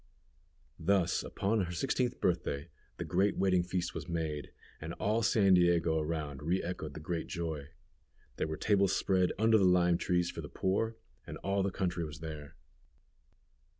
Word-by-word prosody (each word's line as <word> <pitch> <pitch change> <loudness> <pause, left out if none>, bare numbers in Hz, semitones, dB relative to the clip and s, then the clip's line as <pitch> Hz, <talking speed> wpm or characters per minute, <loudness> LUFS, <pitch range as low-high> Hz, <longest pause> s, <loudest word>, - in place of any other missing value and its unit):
Thus, 90 0 +2
upon 100 0 0
her 85 - -6
sixteenth 125 +7 -1
birthday, 85 -3 -1 0.3
the - - -4
great 95 +3 +1
wedding 95 -2 +3
feast 90 0 -2
was - - -6
made, 80 -3 -3 0.3
and 80 +2 -5
all 110 +4 0
San 100 -4 +4
Diego 85 -2 +4
around 75 -3 -3
re 85 +5 0
echoed 85 -4 -5
the - - -5
great 80 +2 -3
joy. 80 -5 -4 0.7
There - - -1
were 80 0 -4
tables 100 -3 +2
spread 95 -2 +2
under 110 +1 +5
the - - +3
lime 90 -2 +4
trees 90 -1 +1
for - - -6
the - - -8
poor, 110 +4 0 0.3
and - - -6
all 100 +1 +1
the 100 - +1
country 90 -3 -2
was 75 -2 -6
there. 75 -2 -8
90 Hz, 165 wpm, -32 LUFS, 80-95 Hz, 0.7 s, under